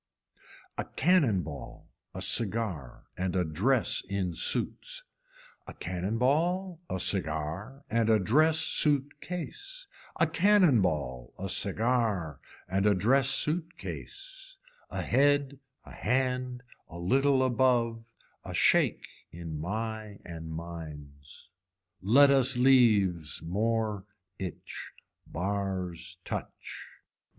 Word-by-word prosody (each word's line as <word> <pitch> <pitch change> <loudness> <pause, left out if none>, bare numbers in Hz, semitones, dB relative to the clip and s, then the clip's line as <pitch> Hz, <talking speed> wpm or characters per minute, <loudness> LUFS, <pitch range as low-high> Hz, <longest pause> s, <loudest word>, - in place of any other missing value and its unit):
A - - -1
cannon 145 - +2
ball 70 -6 -9 0.3
a - - -2
cigar 100 - +1
and 90 0 -2
a 90 - +2
dress 110 - +1
in 95 -3 -2
suits, - - 0 0.6
a - - -9
cannon 95 +5 -3
ball 170 +7 0
a 95 - -2
cigar 90 - -1
and 115 0 +1
a 110 - +5
dress 155 - +3
suit 145 -2 +1
case, 405 - -6 0.3
a - - +5
cannon 185 - +4
ball 70 -9 -2
a 95 - -4
cigar 100 - 0 0.3
and 95 +2 +1
a 105 - +4
dress 125 +8 +3
suit 160 +5 0
case, - - -9 0.3
a - - -4
head 140 0 +2 0.3
a - - -12
hand 125 0 -1 0.3
a 85 - -9
little 135 +9 +2
above, 120 -2 +1 0.4
a - - -6
shake - - +3 0.3
in 80 -2 -7
my 110 +2 -4
and 80 -1 -8
mines. 75 -4 -9 0.5
Let 135 +9 +6
us 135 -1 +4
leaves, 105 - +3
moor 105 +2 -1 0.3
itch. 90 -5 -7 0.3
Bars 90 -2 -3
touch. - - -7
110 Hz, 110 wpm, -29 LUFS, 90-135 Hz, 0.6 s, Let